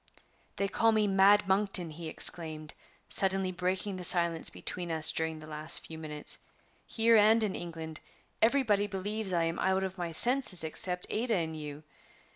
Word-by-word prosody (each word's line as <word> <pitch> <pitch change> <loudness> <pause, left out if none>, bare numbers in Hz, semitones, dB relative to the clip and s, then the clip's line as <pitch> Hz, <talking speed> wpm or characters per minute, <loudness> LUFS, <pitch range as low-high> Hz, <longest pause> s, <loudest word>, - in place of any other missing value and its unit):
"They 200 - -1
call 225 +3 +2
me 215 -1 +1
Mad 195 +1 +4
Monkton!" 190 -3 +1
he 160 +1 -7
exclaimed, 155 -1 -2 0.3
suddenly 190 -1 +1
breaking 185 +2 -2
the 180 - -7
silence 170 -2 +4
between 175 -1 -6
us 160 0 +3
during 160 0 -3
the 155 - -11
last 155 +1 -4
few 160 -1 -9
minutes, 150 -2 -2 0.5
"Here 230 0 +2
and 220 +2 +4
in 205 -3 -2
England 160 -2 -8 0.4
everybody 220 -4 +2
believes 205 +1 -4
I 170 -2 +1
am 165 0 -3
out 190 0 0
of 190 0 -6
my 170 -1 -4
senses 235 -1 +3
except 180 +3 -4
Ada 230 +1 -1
and 160 -3 -3
you. 150 -1 -8
185 Hz, 165 wpm, -30 LUFS, 160-205 Hz, 0.5 s, Mad